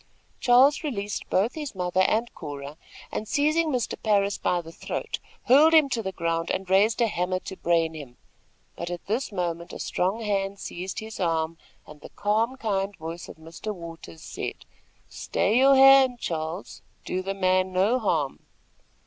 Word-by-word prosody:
Charles 260 +6 +5
released 205 -9 -4
both 205 +6 +2
his 295 -7 -6
mother 180 0 0
and 225 +5 +1
Cora, 145 0 -7 0.4
and, 215 - -4
seizing 310 +5 +2
Mr. 250 -5 -2
Parris 200 -2 +1
by 180 - +1
the 165 -1 -9
throat, - - -5 0.2
hurled 305 +6 +6
him 305 -3 +6
to 235 -3 -1
the 190 -3 -4
ground, 165 -2 -2
and 190 0 -2
raised 205 +5 +3
a 235 - +4
hammer 185 -2 -1
to 190 - -7
brain 165 -2 +1
him; 140 -6 -10 0.6
but 170 - -5
at 175 -1 -6
this 225 +5 -2
moment 170 -3 -3
a - - -6
strong 190 +6 -1
hand 200 -2 -1
seized 185 +1 -6
his 220 0 -8
arm, 165 -2 -1 0.3
and 150 -1 -14
the - - -10
calm, 225 +5 0
kind 200 -4 -1
voice 165 +2 -7
of - - -9
Mr. 165 +7 -7
Waters 165 - -10
said: - - -6 0.4
"Stay 220 +4 0
your 270 +1 +6
hand, 270 -2 +7
Charles. 160 +1 -4 0.2
Do 185 - -2
the 195 +1 -4
man 185 -1 +2
no 200 +7 +2
harm." 160 - 0
195 Hz, 170 wpm, -26 LUFS, 170-230 Hz, 0.6 s, hand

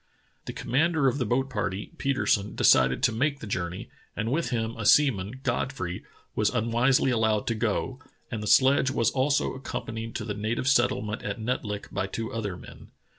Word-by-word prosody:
The - - -5
commander 155 +2 +1
of 135 +2 +1
the 125 - -1
boat 130 +4 +1
party, 105 -5 -3
Petersen, 115 -7 0
decided 65 - +4
to 125 - +4
make 140 +5 0
the - - -8
journey, 90 -3 -4 0.3
and 110 +2 -1
with 165 +5 0
him 115 -1 -2
a 115 - -5
seaman, 125 -2 +3
Godfrey, 120 -7 -2 0.3
was 105 -1 +2
unwisely 125 +3 +2
allowed 110 -3 +1
to 115 - 0
go, 115 +3 -2 0.3
and 110 -3 -3
the 105 - -4
sledge 130 +3 +5
was 115 -3 +1
also 140 +2 +1
accompanied 115 -4 -6
to 110 - -3
the 105 - -3
native 110 +5 -2
settlement 120 -5 +1
at 100 +2 -4
Netlik 110 -3 -3
by 95 -1 -1
two 115 +3 -5
other 105 -5 -3
men. - - -13
115 Hz, 180 wpm, -27 LUFS, 105-130 Hz, 0.3 s, sledge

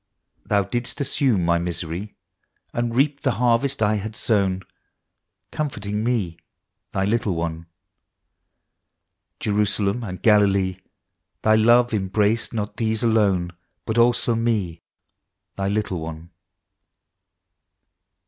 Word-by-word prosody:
Thou 100 -1 +3
didst 120 +7 -4
assume 130 -9 +1
my 85 0 +3
misery, 85 +3 -4 0.6
And 120 -1 -1
reap 140 +2 +2
the 130 - +1
harvest 125 +2 +1
I 105 +1 +2
had 110 +2 -5
sown, 95 -5 +1 0.9
Comforting 105 -8 -3
me 110 -9 -1 0.5
Thy 95 - 0
little 105 -3 0
one. 85 0 -4 1.7
Jerusalem 105 +1 0
and 90 -5 -6
Galilee, 100 -3 +3 0.3
— - - -55
Thy 110 - +4
love 120 +2 +5
embraced 105 +2 +1
not 105 -2 -4
those 110 -1 0
alone, 100 -6 +2 0.3
But 110 +1 0
also 120 0 +3
me 105 -8 -1 0.7
Thy 95 0 -2
little 100 -3 -1
one. 80 +1 -8
105 Hz, 110 wpm, -23 LUFS, 95-115 Hz, 1.7 s, love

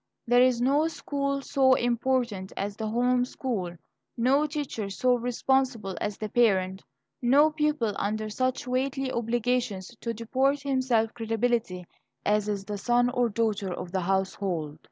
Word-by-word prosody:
There 245 0 +5
is 250 -2 +4
no 280 +6 +3
school 280 -3 -2
so 265 -1 +4
important 240 -5 0
as 200 0 -3
the 220 0 -4
home 245 +2 +2
school, 220 -9 -3 0.4
no 270 +6 +3
teacher 280 -9 -4
so 250 +6 +2
responsible 245 -4 0
as 205 -1 -2
the 215 - -4
parent, 190 -5 +2 0.4
no 280 +5 +5
pupil 300 -8 0
under 215 +2 -2
such 255 +6 -1
weighty 260 +1 -1
obligations 235 -3 -1
to 230 - -2
deport 265 +5 0
himself 260 -5 +1
creditably 225 -5 -1 0.4
as 210 0 +2
is 200 -2 -3
the 205 -1 -4
son 245 +3 +2
or 245 -1 +1
daughter 210 -3 -1
of 180 0 -6
the 190 0 -1
household. 180 -4 -2
240 Hz, 145 wpm, -27 LUFS, 205-260 Hz, 0.4 s, There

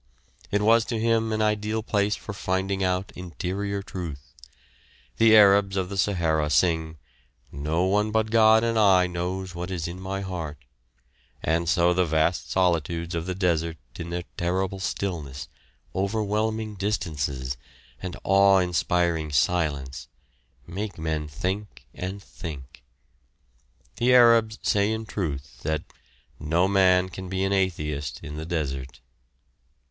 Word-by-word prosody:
It 105 +1 +1
was 115 +1 +5
to 115 -3 -2
him 115 0 +1
an 110 0 +1
ideal 105 +1 0
place 105 -1 +1
for 110 - -8
finding 95 0 -1
out 90 +1 -1
interior 95 +3 -4
truth. 75 - -7 0.8
The 110 -1 +7
Arabs 100 -1 +5
of 95 -1 -1
the 100 - -5
Sahara 85 -6 +1
sing, 80 -1 +1 0.5
"No 75 +5 -1
one 105 +3 +2
but 110 0 0
God 110 0 +6
and 115 -1 +1
I 95 -3 +5
knows 90 +1 -4
what 90 +1 -5
is 85 -4 -3
in 90 +2 -7
my 95 +1 -3
heart," 85 -6 -5 0.9
and 80 +1 +1
so 85 +1 +3
the 90 +1 +2
vast 80 -2 0
solitudes 85 -1 0
of 85 +1 -3
the 90 - -2
desert 85 -3 0 0.2
in 85 - -7
their 90 +1 -3
terrible 95 +2 -1
stillness, 80 -9 -4 0.5
overwhelming 110 +2 -1
distances, 75 -10 -2 0.5
and 90 -1 -5
awe 100 0 +5
inspiring 85 -2 +1
silence, 70 -2 0 0.6
make 100 +3 -5
men 80 -1 -2
think 90 -3 -4
and 95 +2 -6
think. 70 -6 -9 1.2
The 125 +1 +4
Arabs 115 -2 +6
say 100 +1 +2
in 110 0 -3
truth 75 -10 -4
that 80 0 -1 0.6
"No 85 +5 +2
man 95 -2 +4
can 95 0 -8
be 95 0 -1
an 95 0 +1
atheist 75 -8 -1
in 75 -1 -7
the 80 +1 -6
desert." 70 -6 -3
90 Hz, 135 wpm, -25 LUFS, 80-100 Hz, 1.2 s, The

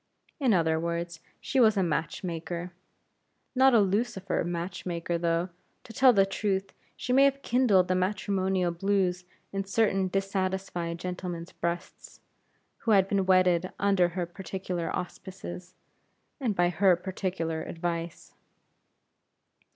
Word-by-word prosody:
In 265 -5 +3
other 160 -4 +2
words, 170 0 -3 0.2
she 270 - -1
was 220 -4 +5
a 190 - +3
match 165 0 -2
maker 175 0 -4 0.8
not 265 -1 +5
a - - +7
Lucifer 195 -1 0
match 175 +1 -4
maker 170 -1 -2
though, 170 +1 0 0.3
to 225 - -12
tell 260 0 +6
the 195 -4 +4
truth, 195 -1 -2 0.2
she 250 - -2
may 270 +2 +6
have 275 0 +1
kindled 225 -7 +3
the 185 - +1
matrimonial 190 -1 0
blues 185 0 0 0.3
in 195 0 -1
certain 195 -1 +1
dissatisfied 190 -3 -2
gentlemen's 180 -1 -5
breasts, 170 +2 -5 0.6
who - - -5
had 195 -3 +5
been 195 -2 0
wedded 185 -1 +3
under 195 -3 +3
her 180 - 0
particular 175 -1 -4
auspices, 180 0 -7 0.6
and 235 -7 -1
by 175 -1 +3
her 180 +1 +4
particular 180 -3 -3
advice. 170 0 -4
185 Hz, 130 wpm, -28 LUFS, 175-195 Hz, 0.8 s, a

